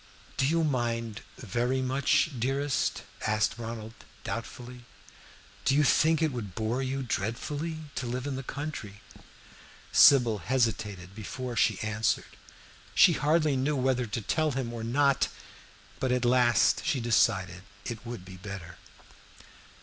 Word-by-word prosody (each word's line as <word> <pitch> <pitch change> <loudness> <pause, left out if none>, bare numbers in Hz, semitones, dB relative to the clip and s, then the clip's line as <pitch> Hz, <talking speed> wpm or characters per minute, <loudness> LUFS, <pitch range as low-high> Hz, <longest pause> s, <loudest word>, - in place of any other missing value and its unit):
"Do 135 - +2
you 165 +2 +2
mind 115 -6 -1 0.2
very 120 +4 -1
much, 140 +4 +2
dearest?" 135 +3 0 0.2
asked 110 +1 +1
Ronald, 115 -1 -6 0.3
doubtfully. 125 0 -6 0.8
"Do 135 - +3
you 150 - +4
think 160 +2 +3
it 155 - +2
would 105 -8 -6
bore 110 +4 -1
you 135 +1 -2
dreadfully 145 +9 -3
to 125 - -3
live 125 +2 -3
in 140 -2 -2
the 135 - -4
country?" 135 -7 -6 0.9
Sybil 120 -6 +6
hesitated 105 -5 -1
before 120 +4 -6
she 110 -4 +2
answered. 110 0 -1 0.6
She - - +7
hardly 150 -1 +2
knew 135 +3 0
whether 130 -2 +1
to 110 +2 -3
tell 155 +7 0
him 125 -3 -3
or 115 -1 -5
not, 140 +3 +2 0.7
but 130 - 0
at 125 -1 +1
last 120 -1 +4
she 135 - 0
decided 100 -6 +2 0.2
it 115 -3 -5
would 120 -6 -7
be 95 0 -10
better. 90 -3 -8
120 Hz, 135 wpm, -29 LUFS, 110-135 Hz, 0.9 s, She